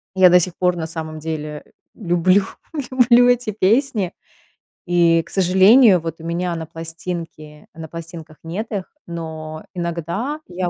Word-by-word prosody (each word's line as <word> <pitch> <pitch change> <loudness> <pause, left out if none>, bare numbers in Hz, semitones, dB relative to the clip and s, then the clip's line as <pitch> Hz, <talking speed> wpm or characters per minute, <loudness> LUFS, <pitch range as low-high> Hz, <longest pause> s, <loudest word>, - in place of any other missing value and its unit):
я 185 -1 +7
до 180 +1 +6
сих 180 0 -2
пор 180 -1 +1
на 165 -2 -4
самом 160 -1 -6
деле 150 -1 -5 0.3
люблю, 185 0 +2 0.7
люблю 245 0 +7
эти 245 -2 +1
песни. 215 -1 +1 0.7
И, 170 -2 +3
к - - -18
сожалению, 190 +3 +5
вот 165 0 -6
у - - -11
меня 170 +1 -2
на 165 -1 -5
пластинке 165 -2 -7
на 160 0 -8
пластинках 165 -1 -9
нет 185 +7 -5
их, 195 -4 -3 0.2
но 160 -2 -7
иногда 175 - -3
я 180 0 -3
170 Hz, 145 wpm, -20 LUFS, 165-190 Hz, 0.7 s, я